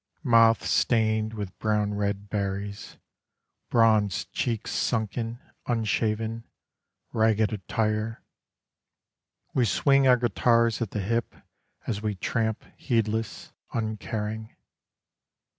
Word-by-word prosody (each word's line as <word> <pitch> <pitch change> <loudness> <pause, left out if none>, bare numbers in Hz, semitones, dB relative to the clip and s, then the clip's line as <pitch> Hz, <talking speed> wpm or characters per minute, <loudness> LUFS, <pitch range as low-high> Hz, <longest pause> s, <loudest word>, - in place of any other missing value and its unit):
Mouths 115 -3 +5
stained 110 -1 +2
with 100 -3 -6
brown 105 -1 +1
red 100 0 -2
berries, 100 0 -4 0.7
Bronzed 110 -4 +2
cheeks 115 -3 -2
sunken, 115 +1 -1 0.3
unshaven, 115 0 -1 0.7
Ragged 110 0 +2
attire; 110 +2 -2 1.3
We 125 - +3
swing 135 +3 +3
our 125 -1 +6
guitars 115 0 +2
at 115 - -1
the 105 - -3
hip 115 +4 -1 0.5
As 105 -3 -2
we 105 -2 -2
tramp 110 +3 -1
heedless, 115 -2 -2 0.2
uncaring. 110 0 -3
110 Hz, 90 wpm, -27 LUFS, 105-115 Hz, 1.3 s, our